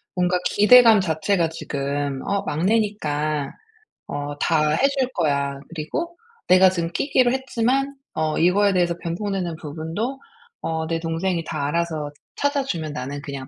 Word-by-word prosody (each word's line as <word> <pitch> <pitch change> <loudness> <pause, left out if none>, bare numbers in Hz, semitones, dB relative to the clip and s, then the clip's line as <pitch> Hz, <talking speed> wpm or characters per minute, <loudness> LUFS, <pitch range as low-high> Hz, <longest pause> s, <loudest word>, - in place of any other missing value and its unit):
뭔가 180 0 +2
기대감 225 +1 +7
자체가 165 +1 0
지금 140 -3 -3
'어 200 0 0
막내니까 155 -6 0 0.6
어 145 0 -4
다 155 -2 +2
해 210 - +3
줄 260 -1 +1
거야. 140 -4 0
그리고 170 - -4 0.3
내가 185 +1 +7
지금 170 -2 -2
끼기로 255 - +2
했지만 265 +1 0 0.2
어 155 -1 0
이거에 195 +4 +4
대해서 175 -2 +1
변통되는 175 0 -3
부분도 165 - -4 0.4
어 160 0 -2
내 165 0 -1
동생이 165 +1 -1
다 140 -2 -2
알아서 160 -2 -2 0.2
찾아 285 -1 0
주면 160 - -3
나는 140 +1 -5
그냥 140 -2 -7
170 Hz, 290 characters per minute, -22 LUFS, 150-205 Hz, 0.6 s, 기대감